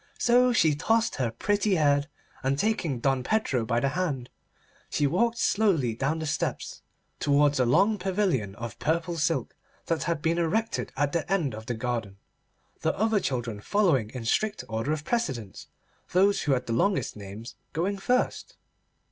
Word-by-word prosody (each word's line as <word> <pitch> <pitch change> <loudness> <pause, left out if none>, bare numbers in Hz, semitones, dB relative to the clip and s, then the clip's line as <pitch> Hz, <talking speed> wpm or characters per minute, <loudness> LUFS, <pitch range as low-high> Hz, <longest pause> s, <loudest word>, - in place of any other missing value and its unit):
So 245 +1 +4
she 165 -10 +4
tossed 225 +10 +1
her 125 -4 0
pretty 205 - +1
head, 145 -3 +2 0.3
and 135 +1 0
taking 170 - 0
Don 135 -1 +1
Pedro 135 - 0
by 115 +1 +1
the 135 - +1
hand, 140 -7 -2 0.6
she 145 - +1
walked 230 +10 +1
slowly 185 - +2
down 135 +7 -1
the 160 - -4
steps 145 - -3 0.4
towards 145 0 +3
a 125 - +3
long 205 - +3
pavilion 180 - 0
of 115 0 -7
purple 170 +2 0
silk 155 -5 -1 0.3
that 165 -1 -1
had 165 -3 -1
been 165 +1 +1
erected 220 +7 -1
at 145 0 +1
the 170 +2 -2
end 170 - +1
of 110 +1 -8
the 120 - -2
garden, 115 -4 -3 0.6
the - - -1
other 220 0 +2
children 120 - -3
following 160 - +2
in 125 -1 -7
strict 215 - 0
order 115 +6 -2
of 155 -1 -2
precedence, 135 - -3 0.5
those 195 +3 +4
who 145 - +1
had 125 -1 -1
the 115 - -2
longest 195 - +1
names 105 +3 -9 0.2
going 195 +5 -1
first. 250 +6 -1
150 Hz, 165 wpm, -27 LUFS, 125-195 Hz, 0.6 s, So